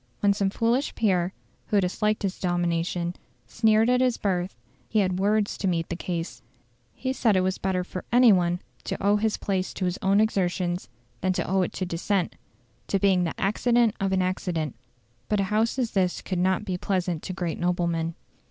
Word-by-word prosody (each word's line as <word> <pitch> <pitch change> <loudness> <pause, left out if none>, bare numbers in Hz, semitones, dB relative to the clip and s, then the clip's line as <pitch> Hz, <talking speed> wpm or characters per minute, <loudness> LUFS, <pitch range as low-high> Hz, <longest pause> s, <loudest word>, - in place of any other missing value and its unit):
When 200 -1 +4
some 200 -1 0
foolish 235 +7 0
peer, 185 -5 +1 0.4
who 205 - +3
disliked 210 +3 0
his 195 -1 -2
domination, 175 0 -1 0.3
sneered 220 0 +3
at 250 +1 +3
his 250 -2 +2
birth, 185 - -1 0.3
he 220 - -1
had 185 -3 +2
words 205 +1 +1
to 195 - 0
meet 165 -2 0
the 175 - -2
case: 165 -9 -4 0.5
he 260 0 -2
said 225 -6 +2
it 185 - +4
was 185 0 -1
better 185 -1 0
for 185 0 -6
any 245 -2 +7
one 175 -1 +1 0.2
to - - -2
owe 205 +2 +3
his 220 0 0
place 190 -2 -2
to 185 - -2
his 180 0 -2
own 195 +1 +3
exertions 180 -4 0 0.3
than 185 0 +1
to - - -2
owe 190 0 +2
it 180 - -1
to 185 - -2
descent, 180 +2 -1 0.5
to 195 - +1
being 190 -2 +3
the 165 - -4
"accident 230 +3 +2
of 195 0 0
an 190 -1 +2
accident". 175 -5 -2 0.6
But 210 - +2
such - - +2
a 190 - -5
House 225 +4 +1
as 245 -4 0
this 185 -2 0
could 185 -2 -2
not 185 +2 +1
be 185 -3 -3
pleasant 180 -5 -1
to 185 - -5
great 175 -3 -3
noblemen. 170 -2 0
190 Hz, 200 wpm, -26 LUFS, 180-210 Hz, 0.6 s, any